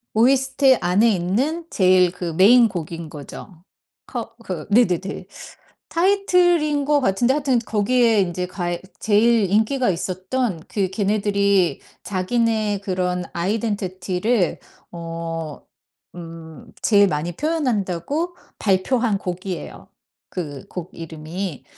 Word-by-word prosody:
OST 265 +2 +4
안에 180 +6 +3
있는 255 - -1
제일 185 -2 +4
그 175 -2 -5
메인 230 +8 +6
곡인 170 -4 -6
거죠. 160 +4 -10 0.4
커 230 -2 -5
그 180 -7 -5
네네네. 195 -4 +2 0.6
타이틀인 350 -5 +2
것 290 0 +3
같은데 240 +3 +2
하여튼 275 -3 +1
거기에 225 0 +2
인제 180 -1 -2
가에 175 -1 -3 0.2
제일 220 -1 +3
인기가 220 +4 +2
있었던 185 +2 -2
그 195 -3 -1
걔네들이 200 -2 +1 0.2
자기네 210 +1 0
그런 180 -2 -1
아이덴티티를 190 0 -1 0.3
어 165 -2 -5 0.5
음 165 -2 -10
제일 205 -2 +5
많이 165 +1 -2
표현한다고 290 - -1 0.2
발표한 215 +3 +1
곡이에요 185 0 -6 0.4
그 145 -7 -6
곡 180 -1 -7
이름이. 165 +1 -6
195 Hz, 235 characters per minute, -22 LUFS, 175-240 Hz, 0.6 s, 메인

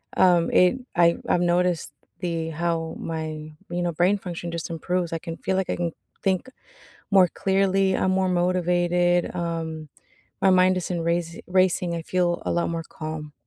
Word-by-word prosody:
Um, 175 -2 +4
It 180 +7 +4 0.2
I 170 -1 +4
I've 175 - +2
noticed 175 -2 +1 0.3
the 165 -3 -2
how 165 0 -2
my, 155 -1 -5 0.2
you 175 0 -2
know, 175 -1 0
brain 180 +5 +2
function 175 -2 -6
just 170 -1 -4
improves, 170 +1 -2
I 165 - -2
can 165 -1 -7
feel 190 - -1
like 190 -1 -1
I - - 0
can 170 -1 -2 0.3
think 190 +5 0 0.6
more 190 -3 +6
clearly, 195 0 +1
I'm 185 - +1
more 190 0 +1
motivated, 175 0 +1
um, 165 -3 -4 0.5
my 190 - +4
mind 185 0 +4
isn't 180 -1 -2
raci 170 0 -1
racing, 180 -1 +2
I 165 - -3
feel 175 0 0
a - - -1
lot 170 0 0
more 165 -1 -3
calm. 155 -1 -6
175 Hz, 170 wpm, -24 LUFS, 165-185 Hz, 0.6 s, more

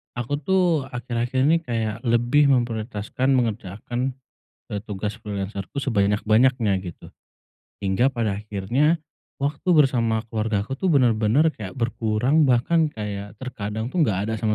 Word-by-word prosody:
aku 120 +4 -2
tuh 170 -3 +1
akhir-akhir 120 0 -3
ini 160 +4 +4
kayak 115 -7 -3
lebih 120 +5 +3
memprioritaskan 120 0 0
mengerjakan, 120 +2 -2 0.5
eee, 105 - -3
tugas 105 0 -4
freelancer-ku 100 +3 -5
sebanyak-banyaknya 110 0 +2
gitu. 85 - -9 0.7
Hingga 105 +7 +1
pada 110 -5 -1
akhirnya 110 - 0 0.4
waktu 145 +5 -2
bersama 125 -8 +3
keluargaku 110 +2 -2
tuh 185 0 +1
bener-bener 120 +2 +3
kayak 105 -11 -6
berkurang, 120 +6 +2
bahkan 150 +5 +2
kayak 100 -2 -5
terkadang 110 -3 -4
tuh 165 +4 +2
enggak 100 -2 -1
ada 110 - -1
sama 110 0 0
115 Hz, 125 wpm, -23 LUFS, 105-135 Hz, 0.7 s, ini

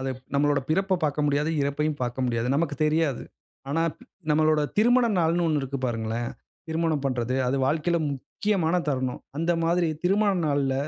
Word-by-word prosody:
அதுப் 130 -1 -4
நம்மளோட 145 0 +2
பிறப்ப 190 +2 +1
பார்க்க 150 0 0
முடியாது, 145 +2 +1
இறப்பயும் 150 +2 -1
பார்க்க 125 +1 -2
முடியாது, 120 0 -1
நமக்கு 145 -1 0
தெரியாது. 155 -4 +1 0.5
ஆனா, 165 +3 +1 0.2
ப் 250 - -16 0.3
நம்மளோட 155 0 +3 0.2
திருமண 245 +3 +5
நாள்னு 170 +1 +2
1 155 -2 +1
இருக்கு 135 +1 -4
பாருங்களேன்! 115 0 -2 0.4
திருமணம் 160 -2 0
பண்றது 125 -2 -1
அது 130 - +1
வாழ்க்கையில, 160 +4 +1
முக்கியமான 180 - -1
தருணம். 130 -3 -1 0.2
அந்த 165 +2 +1
மாதிரி 170 0 +2 0.2
திருமண 200 +3 +3 0.2
நாள்ல 140 -2 +1
150 Hz, 155 wpm, -26 LUFS, 135-165 Hz, 0.5 s, திருமண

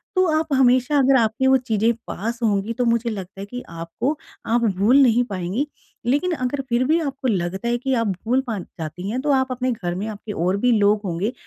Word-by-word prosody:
तो 370 0 +4
आप 315 -2 -2
हमेशा 260 +2 +3
अगर 270 0 +5
आपके 225 +4 +1
वो 265 0 +6
चीज़ें 230 -2 +1
पास 230 +5 -4
होंगी 210 +1 +1
तो 245 +1 -1
मुझे 235 0 +1
लगता 195 -3 -7
है 200 - -5
कि 245 +4 -7
आपको 170 - -3 0.3
आप 235 +1 +1 0.2
भूल 220 +8 +4
नहीं 245 -2 +4
पाएँगी। 195 +8 -2 0.4
लेकिन 290 +9 +1
अगर 270 0 -2
फ़िर 240 +2 +2
भी 325 +2 +3
आपको 275 -3 -3
लगता 190 0 -1
है 240 0 +1
कि 265 +2 -1
आप 230 -3 +1 0.2
भूल 250 +4 +2
पा 220 -3 -2
जाती 175 +3 -7
हैं 250 +4 -2
तो 295 0 +1
आप 260 0 -1
अपने 255 0 -1
घर 175 -6 -3
में 205 +4 -3
आपके 210 0 -7
और 185 +2 0
भी 245 +4 +2
लोग 205 +1 +3
होंगे 190 +7 -2
235 Hz, 220 wpm, -22 LUFS, 200-260 Hz, 0.4 s, वो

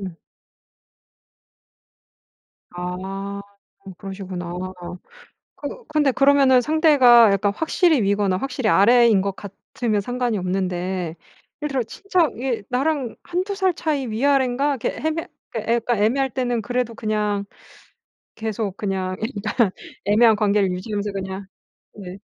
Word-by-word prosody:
음. 185 -4 -7 2.6
아. 190 +3 -5 0.4
좀 195 -1 -10
그러시구나. 190 -3 -6 1.0
그 380 +12 -7
근데 300 -3 +2
그러면은 275 -1 +5
상대가 260 -7 +6
약간 200 +1 +1
확실히 320 - +2
위거나 200 -1 +1
확실히 255 -3 -1
아래인 230 0 +5
것 195 0 -3
같으면 210 +2 -3
상관이 245 0 -2
없는데 180 -2 -2 0.5
예를 300 - -1
들어 270 -3 0
진짜 355 - 0
얘 250 -4 -2
나랑 265 -1 -1
1-2 370 +3 -2
살 380 -3 +1
차이 295 -5 -1
위아랜가 265 +3 +1
이렇게 - - +1
해해 - - -8
그러니까 325 +1 -3 0.2
그 225 - -3
약간 235 -2 +1
애매할 265 +4 +2
때는 245 -2 -1
그래도 245 +1 -2
그냥 210 -2 -1 0.9
계속 220 -3 -3
그냥 190 -3 -2
일단 220 -1 0 0.3
애매한 220 +2 +5
관계를 205 -2 +2
유지하면서 205 +2 -3
그냥. 190 0 -5 0.5
네. 190 -2 -9
220 Hz, 270 characters per minute, -22 LUFS, 195-265 Hz, 2.6 s, 상대가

